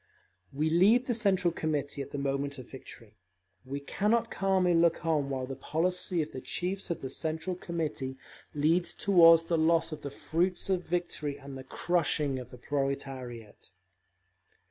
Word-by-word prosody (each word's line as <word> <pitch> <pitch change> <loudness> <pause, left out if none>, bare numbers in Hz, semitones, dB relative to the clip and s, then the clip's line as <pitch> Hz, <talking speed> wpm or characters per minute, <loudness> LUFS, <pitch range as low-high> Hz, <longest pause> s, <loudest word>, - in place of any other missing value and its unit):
We 155 +3 0
leave 210 +9 +5
the 245 - 0
Central 190 -6 +2
Committee 150 -3 -2
at 135 - -6
the - - -5
moment 140 +1 -1
of 130 -2 -9
victory; 115 -5 -12 0.4
we 140 +2 -5
cannot 215 +10 0
calmly 190 -2 +2
look 170 0 +3
on 150 -4 +1
while 130 -2 -2
the 135 +1 -6
policy 170 +4 -1
of 150 - -9
the 130 - -7
chiefs 190 +2 -3
of 170 - -3
the 130 - -4
Central 160 +3 -3
Committee 155 -7 -4 0.4
leads 165 +4 +2
toward 165 -4 +7
the 165 0 0
loss 165 +1 +3
of 155 - -6
the 140 - -5
fruits 175 +7 -1
of 180 -2 -1
victory 160 -4 -2
and 140 0 -9
the 130 - -7
crushing 150 -2 0
of 125 -1 -9
the 125 - -11
proletariat…. 135 -6 -4
155 Hz, 165 wpm, -30 LUFS, 140-175 Hz, 0.4 s, toward